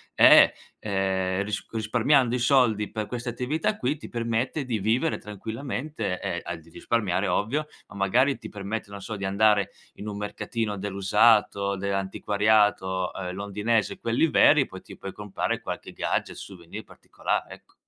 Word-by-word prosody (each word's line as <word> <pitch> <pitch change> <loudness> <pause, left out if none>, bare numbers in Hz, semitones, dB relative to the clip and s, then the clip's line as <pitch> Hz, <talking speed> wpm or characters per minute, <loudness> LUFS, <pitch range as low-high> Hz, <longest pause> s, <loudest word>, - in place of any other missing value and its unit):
è, - - +8 0.3
ehm, 95 -1 -1
ris 100 -1 -4
risparmiando 120 +3 +2
i - - -1
soldi 120 -6 +3
per 110 -1 -3
questa 120 0 -4
attività 150 - -1
qui 140 +5 -1
ti - - -10
permette 120 +5 -1
di 120 -4 -2
vivere 115 +10 +1
tranquillamente 115 +2 -5
e 85 - -2
al 85 -1 -5
di 85 - -19
risparmiare 100 0 -1
ovvio, 145 +9 0 0.2
ma - - -14
magari 120 +8 +2
ti - - -9
permette 100 +1 -5
non 100 -1 -8
so 110 +3 -5
di 100 - -4
andare 100 +1 +3 0.2
in 105 - -8
un 100 -1 -5
mercatino 105 +1 -3
dell'usato, 100 +1 +3
dell'antiquariato, 100 -1 +1
uhm, 90 -2 -5
londinese, 105 +3 -1
quelli 115 +8 +2
veri, 145 -2 +5
poi 95 - -10
ti - - -13
puoi 95 - -7
comprare 105 -2 -3
qualche - - -6
gadget, - - -2
souvenir 85 -4 -9
particolare, - - -4
ecco. - - -25
105 Hz, 155 wpm, -26 LUFS, 100-120 Hz, 0.3 s, è